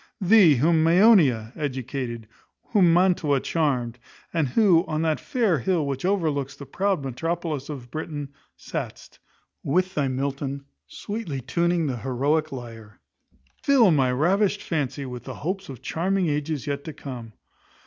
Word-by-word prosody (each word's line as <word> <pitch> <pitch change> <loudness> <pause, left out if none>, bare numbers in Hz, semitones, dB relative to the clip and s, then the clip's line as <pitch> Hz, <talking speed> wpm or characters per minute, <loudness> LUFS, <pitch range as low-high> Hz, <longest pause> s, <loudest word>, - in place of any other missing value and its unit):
Thee, 190 -5 +6
whom 160 +5 +3
Maeonia 165 - +4
educated, 130 -5 -4 0.4
whom 190 -7 +4
Mantua 170 -5 +3
charmed, 130 -7 -1 0.3
and 160 -4 +1
who, 175 - +4
on 155 0 -1
that 160 -2 +1
fair 220 - 0
hill 165 +3 0
which 135 +2 -3
overlooks 155 -8 0
the 140 - -10
proud 195 -1 -1
metropolis 155 +1 -3
of 125 -5 -8
Britain, 150 -2 -5 0.3
sat'st, - - -7 0.4
with 185 +6 0
thy 145 -5 0
Milton, 140 +1 -3 0.2
sweetly 205 -10 -5
tuning 170 +6 0
the 130 -4 -2
heroic 140 +6 0
lyre; 115 -5 -9 0.6
fill 255 -9 +5
my 135 -5 +3
ravished 195 +9 +1
fancy 145 -3 -2
with 125 -2 -7
the - - -6
hopes 190 +4 -4
of 130 -4 -9
charming 185 +2 0
ages 150 -1 -2
yet 140 -1 -3
to 160 - -6
come. 120 -6 -8
150 Hz, 140 wpm, -24 LUFS, 135-175 Hz, 0.6 s, Thee